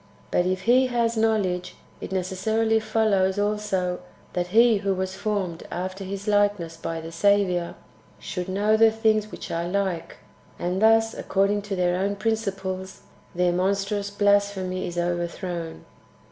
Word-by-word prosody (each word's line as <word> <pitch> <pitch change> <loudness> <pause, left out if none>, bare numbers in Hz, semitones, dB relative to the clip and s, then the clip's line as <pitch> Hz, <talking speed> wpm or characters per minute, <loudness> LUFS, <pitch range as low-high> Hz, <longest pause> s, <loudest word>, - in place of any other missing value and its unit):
But 180 - +2
if 185 0 -1
He 255 +2 +4
has 235 -2 0
knowledge, 200 -5 0 0.2
it - - -7
necessarily 220 +4 +1
follows 215 -3 +1
also 205 -3 -1 0.3
that 175 0 -1
he 225 +3 +5
who 195 -1 -1
was 190 0 -3
formed 190 -5 -2
after 185 +2 -4
his 200 +2 -6
likeness 205 -5 +1
by 165 0 -4
the 165 0 -8
Saviour 180 -1 +2 0.4
should 180 0 -5
know 205 +3 +2
tlie 225 0 +6
things 215 -1 +1
which - - -8
are 170 +1 -2
like; 190 -3 -2 0.4
and 180 +2 -2
thus, 225 0 +4
according 200 +1 0
to 195 - -1
their 180 -1 +1
own 200 +2 0
principles, 195 -3 -3 0.3
their 180 0 +2
monstrous 200 +2 0
blasphemy 200 -2 +1
is 175 - -6
overthrown. 175 - -3
195 Hz, 145 wpm, -25 LUFS, 180-210 Hz, 0.4 s, tlie